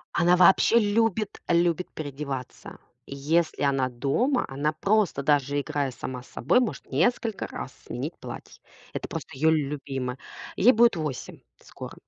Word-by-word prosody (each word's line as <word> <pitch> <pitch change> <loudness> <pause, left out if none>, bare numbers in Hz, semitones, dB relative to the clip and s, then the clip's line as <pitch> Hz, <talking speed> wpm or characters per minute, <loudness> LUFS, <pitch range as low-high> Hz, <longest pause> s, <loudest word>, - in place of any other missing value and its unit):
Она 175 +1 +4
вообще 190 +5 +6
любит, 215 -1 0
любит 175 +1 +2
переодеваться. 140 -3 -6 0.3
Если 155 +5 0
она 135 -2 +1
дома, 145 - 0
она 140 +3 -1
просто 195 -2 +1
даже 145 0 +2
играя 145 -2 -2
сама 125 +1 -6
с 125 - -17
собой, 170 - +2
может 245 -3 -3
несколько 215 - 0
раз - - -7
сменить - - -4
платье. - - -10 0.3
Это - - -4
просто - - -6
её 160 +4 +3
любимое. 135 -4 -2 0.4
Ей 240 - +6
будет 235 -2 +4
8 155 -5 -5 0.2
скоро. - - -10
155 Hz, 140 wpm, -26 LUFS, 135-195 Hz, 0.4 s, вообще